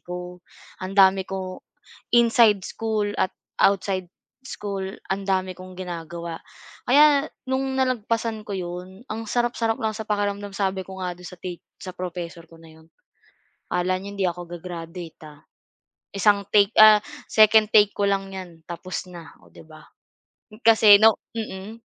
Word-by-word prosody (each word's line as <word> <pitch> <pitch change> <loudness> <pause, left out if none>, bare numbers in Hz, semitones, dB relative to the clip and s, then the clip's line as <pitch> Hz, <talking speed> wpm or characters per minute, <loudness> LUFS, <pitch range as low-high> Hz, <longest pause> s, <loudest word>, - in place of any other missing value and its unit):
ko. 180 0 -8 0.4
Ang 190 +2 -6
dami 190 -1 +5
ko 190 -1 -5 0.5
inside 230 -3 +5
school 220 -2 -2
at 190 - 0 0.3
outside 190 -2 +1 0.3
school 200 -6 -5 0.3
ang 195 - -4
dami 190 -1 -1
kong 185 0 -12
ginagawa. 170 -2 -6 0.5
Kaya 290 +2 +5 0.2
no'ng 265 0 -1
nalagpasan 230 -3 -1
ko 205 - -9
'yon, 180 +5 -7
ang 225 +1 -5
sarap-sarap 240 -2 0
lang 220 -1 -1
sa 220 - -5
pakiramdam. 205 -1 -1
Sabi 190 -1 -1
ko 190 0 -10
nga 180 -1 -3
do'n 180 0 -11
sa 180 - -11
ti 175 -1 -7 0.2
sa 185 - -8
professor 175 -2 -6
ko 165 - -16
na 165 -1 -16
'yon, 160 0 -20 0.9
"Akala 185 +1 +1
niyo 200 +2 -8
hindi 195 -1 -2
ako 175 0 -5
ga-graduate, 170 -1 -8
ah." 150 -1 -14 0.7
Isang 200 0 +3
take 205 0 +5
ah, 215 -1 +9 0.3
second 215 0 +6
take 205 -1 +6
ko 205 - 0
lang 195 0 -1
'yan 175 -3 -9
tapos 180 +2 -6
na, 170 -4 -11
oh - - -21
'di - - -15
ba? 155 -1 -15 0.8
Kasi 220 -2 +8
'no 225 -1 +7 0.2
mm. 220 +1 -6
195 Hz, 155 wpm, -24 LUFS, 180-215 Hz, 0.9 s, ah